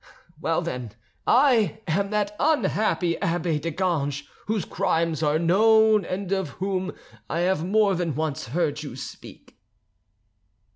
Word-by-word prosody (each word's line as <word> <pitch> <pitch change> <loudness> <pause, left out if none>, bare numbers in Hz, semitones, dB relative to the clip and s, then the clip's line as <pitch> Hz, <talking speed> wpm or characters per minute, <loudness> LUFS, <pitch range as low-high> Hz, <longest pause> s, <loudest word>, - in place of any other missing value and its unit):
Well, 165 +1 0
then, 125 -9 -5 0.3
I 240 -5 +4
am 195 +4 0
that 210 0 -1
unhappy 215 - +1
abbe 165 -2 0
de 165 +3 -3
Ganges 145 -5 -1 0.2
whose 215 -2 -1
crimes 165 -4 0
are 150 0 +2
known 215 +5 +4
and 190 0 -4
of 190 -5 0
whom 190 0 -2 0.4
I 170 - -1
have 180 -2 +1
more 205 +2 +3
than 170 -5 -1
once 155 -5 -2
heard 150 +2 -1
you 145 -5 -7
speak." 130 - -11
175 Hz, 135 wpm, -25 LUFS, 160-200 Hz, 0.4 s, I